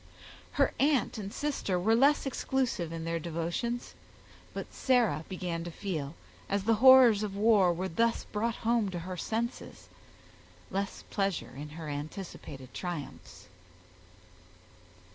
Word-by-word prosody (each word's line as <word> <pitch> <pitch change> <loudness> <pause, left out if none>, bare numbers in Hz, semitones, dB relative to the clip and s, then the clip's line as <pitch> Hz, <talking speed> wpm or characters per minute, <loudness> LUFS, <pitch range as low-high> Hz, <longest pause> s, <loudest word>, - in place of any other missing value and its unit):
Her - - +2
aunt 275 -5 +2
and 200 -1 -5
sister 270 -11 -1
were 215 +5 +3
less 280 +6 +4
exclusive 255 -10 -1
in 165 -1 -5
their 165 0 -1
devotions; 170 +9 -3 0.6
but - - -7
Sarah 245 - +2
began 175 -3 -3
to 175 - -5
feel, 165 -5 -4 0.3
as 200 0 0
the 225 +3 +3
horrors 260 -5 +8
of 205 -2 -3
war 205 -4 +5
were 180 +2 -2
thus 230 +7 +1
brought 225 +2 -2
home 230 -3 +2
to 180 -2 -4
her 185 0 -4
senses, 230 +7 -4 0.8
less 195 +1 -3
pleasure 195 - -1
in 145 +2 -7
her 160 -2 -6
anticipated 145 -3 -7
triumphs. 175 -6 -6
195 Hz, 130 wpm, -30 LUFS, 170-230 Hz, 0.8 s, horrors